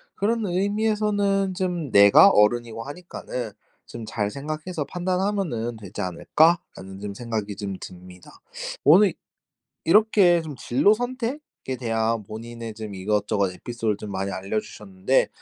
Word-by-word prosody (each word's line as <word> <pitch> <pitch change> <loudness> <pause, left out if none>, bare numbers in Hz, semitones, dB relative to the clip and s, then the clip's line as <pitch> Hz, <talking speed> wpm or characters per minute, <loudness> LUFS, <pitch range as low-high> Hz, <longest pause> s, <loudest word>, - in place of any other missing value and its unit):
그런 225 +1 0
의미에서는 205 0 +1
좀 175 - -2
내가 100 - +8
어른이고 115 - +2
하니까는 140 -7 -6 0.4
'좀 120 - -8
잘 105 -1 -2
생각해서 155 +3 -4
판단하면은 180 - -2
되지 105 -1 -7
않을까?'라는 95 - 0
좀 100 0 -5
생각이 110 -2 -4
좀 100 -2 -5
듭니다. 90 0 -12 0.5
오늘 185 +5 +6 0.7
이렇게 190 -1 +5
좀 150 -4 -8
진로 165 - +3
선택에 245 - -5
대한 115 -2 0
본인의 115 +1 -8
좀 110 -2 -7
이것저것 100 0 0
에피소드를 115 +1 -3
좀 105 - -7
많이 95 +1 -3
알려주셨는데 100 +3 -1
120 Hz, 305 characters per minute, -24 LUFS, -, 0.7 s, 내가